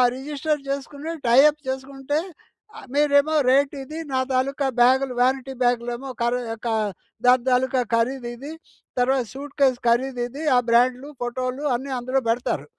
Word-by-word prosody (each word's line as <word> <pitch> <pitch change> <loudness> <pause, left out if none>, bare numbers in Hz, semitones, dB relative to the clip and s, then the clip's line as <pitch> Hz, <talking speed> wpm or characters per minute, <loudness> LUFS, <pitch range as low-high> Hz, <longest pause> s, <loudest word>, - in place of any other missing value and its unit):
Register 295 +2 -2
చేసుకొని 280 +3 -4
tie 235 +2 +6
up 300 0 -6
చేసుకుంటే 270 +2 -3 0.8
మీరేమో 295 +1 +3
రేట్ 275 +2 +3
ఇది, 305 +4 -8 0.2
నా 260 - +2
తాలుకా 270 +2 0
బ్యాగులు 260 +1 +4
వారెంటీ 265 +1 +1
బ్యాగ్‌లేమో 245 +2 -1
ఖరీ 240 +1 +1 0.2
క - - 0 0.6
దాని 250 0 +5
తాలుకా 255 +1 +2
ఖరీదు 240 +1 -1
ఇది. 280 +5 -8 0.5
తర్వాత 260 0 +2
సూట్కేస్ 275 -1 0
ఖరీదు 245 +1 +1
ఇది. 280 +6 -8
ఆ 245 - +6
బ్రాండ్లు, 250 +4 +3
ఫోటోలు 255 +3 -3
అన్నీ 270 +3 -5
అందులో 255 +2 0
పెడతారు. 240 +2 -1
265 Hz, 135 wpm, -23 LUFS, 245-280 Hz, 0.8 s, tie